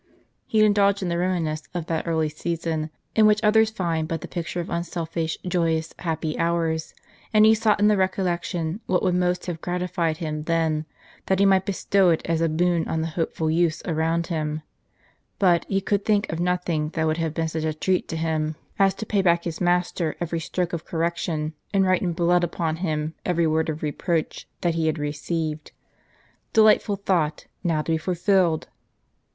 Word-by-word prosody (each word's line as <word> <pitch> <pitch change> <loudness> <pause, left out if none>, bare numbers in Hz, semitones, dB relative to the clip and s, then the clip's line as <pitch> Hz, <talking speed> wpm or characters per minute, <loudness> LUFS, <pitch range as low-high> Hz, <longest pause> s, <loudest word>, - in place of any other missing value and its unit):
He 215 -1 +4
indulged 200 -1 +3
in 180 - -1
the 170 - 0
reminiscence 165 -4 -1
of 170 -3 -2
that 165 -1 -2
early 160 -1 +1
season 160 0 -3 0.3
in 215 -1 +6
which 210 +1 +3
others 220 +1 +5
find 170 -6 -2
but 165 -2 -3
the - - -6
picture 170 0 -4
of 170 - -3
unselfish, 165 -1 -2
joyous, 165 -3 0
happy 160 -2 -2
hours; 165 -1 0 0.4
and 215 -1 +6
he 220 - +7
sought 220 -1 +2
in 205 - +5
the 210 - +5
recollection 180 -1 -1
what 180 -1 +1
would 185 - +2
most 180 0 0
have 170 -3 -5
gratified 175 -2 -1
him 155 -3 -4
then, 160 -2 0 0.4
that 190 - +2
he 200 - +4
might 190 -1 +3
bestow 195 -1 +2
it 165 - +1
as 165 -1 0
a 165 - +2
boon 170 +1 +1
on 160 - -1
the 165 - -2
hopeful 160 -1 -1
youths 165 -1 +1
around 165 0 0
him. 155 -2 -3 0.7
But 175 -3 +3
he 195 -1 +1
could 200 +1 0
think 210 -1 +1
of 165 - -3
nothing 175 -3 0
that 160 -1 0
would 155 0 +1
have 160 -2 -2
been 165 -1 0
such 160 0 -3
a 160 - 0
treat 180 +4 0
to 165 - -4
him, 155 -1 -1 0.2
as 195 -1 +4
to 220 - -5
pay 205 -2 +1
back 170 -2 +3
to - - -2
his 160 - -8
master 175 -2 +1
every 170 -1 -2
stroke 175 +2 -2
of 170 - -3
correction, 165 -2 -2 0.2
and 195 -1 +4
write 185 -1 +2
in 175 -3 0
blood 175 +1 +2
upon 165 -2 -1
him 155 -3 -2
every 170 -2 +1
word 160 0 +1
of 155 0 -4
reproach 160 +2 -2
that 170 -2 +1
he 165 -1 0
had 155 0 0
received. 150 +1 -3 0.8
Delightful 215 -1 +5
thought, 180 -6 0 0.2
now 160 -4 +1
to 165 - -3
be 160 - +3
fulfilled 180 -1 +1
170 Hz, 190 wpm, -24 LUFS, 160-185 Hz, 0.8 s, he